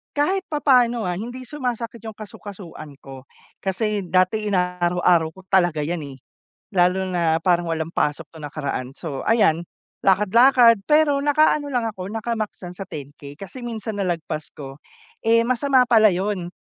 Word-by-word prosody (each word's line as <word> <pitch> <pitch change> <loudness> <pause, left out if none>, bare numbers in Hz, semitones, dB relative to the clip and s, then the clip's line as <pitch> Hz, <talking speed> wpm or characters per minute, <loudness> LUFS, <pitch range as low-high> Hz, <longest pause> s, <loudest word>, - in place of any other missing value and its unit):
kahit 375 +7 0
papaano 250 -6 +2
ah, 180 -1 -1
hindi 245 +3 -7
sumasakit 240 -4 -4
yung 220 - -7
kasu-kasuan 190 -8 -10
ko, 135 0 -11 0.3
kasi 210 +2 -1
dati 185 +4 +1
ina-araw-araw 180 -3 +2
ko 190 - -14
talaga 175 -5 +3
yan 170 +3 -2
eh. 135 -1 -10 0.6
Lalo 180 +1 +2
na 170 -3 +1
parang 175 0 +1
walang 160 +1 -3
pasok 150 -1 -1
nung 155 -2 -10
nakaraan, 140 -4 -4
so 145 -2 -6
ayan, 200 -8 +3 0.4
lakad-lakad 230 +3 +5
pero 300 -1 +3
naka-ano 295 0 +2
lang 245 -3 0
ako, 195 -3 -6
naka-max 225 -1 -3
lang 175 - -8
sa 195 - -6
10K 145 0 -9
kasi 220 +6 -9
minsan 220 -2 -5
nalagpas 165 -4 -3
ko, 135 0 -10 0.4
eh, 230 +1 +4
masama 255 0 +3
pala 220 -3 +5
yun, 185 -1 -2
195 Hz, 150 wpm, -22 LUFS, 170-235 Hz, 0.6 s, lakad-lakad